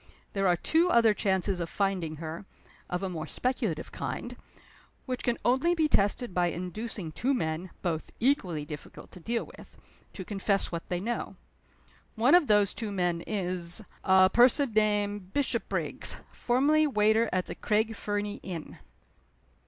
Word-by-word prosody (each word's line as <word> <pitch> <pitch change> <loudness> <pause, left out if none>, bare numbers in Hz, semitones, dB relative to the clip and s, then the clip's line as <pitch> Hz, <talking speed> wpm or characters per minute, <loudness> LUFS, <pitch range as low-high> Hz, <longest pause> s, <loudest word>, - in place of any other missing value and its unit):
There 195 -1 +1
are 175 - +4
two 325 - +2
other 230 -7 +5
chances 190 -2 0
of 170 - -3
finding 190 -6 -1
her 160 +4 -7 0.4
(of 180 +2 -2
a - - 0
more 160 -3 -5
speculative 225 - -2
kind) - - -5 0.7
which 255 -2 -3
can 240 -1 0
only 265 +8 +3
be 320 -2 +2
tested 205 -3 +1
by 175 -1 +2
inducing 180 +1 -4
two 265 - 0
men 160 -4 -2
(both 165 -3 -2
equally 185 - +1
difficult 150 -1 -10
to 180 - -10
deal 230 +7 -2
with) - - -18
to 190 - -7
confess 200 0 0
what 170 -1 -5
they 180 - -2
know. 235 +6 -3 0.8
One 235 +6 +4
of 350 -4 +6
those 205 -2 +4
two 220 -3 -4
men 175 -3 0
is 180 -2 -2 0.2
a 190 0 +6
person 250 +2 +5
named 205 -2 0
Bishopriggs, 285 -2 0 0.2
formerly 295 +5 +2
waiter 220 -2 +3
at 185 -1 0
the - - -6
Craig 220 +1 0
Fernie 205 -1 -3
inn." 170 -4 -7
205 Hz, 150 wpm, -29 LUFS, 180-235 Hz, 0.8 s, of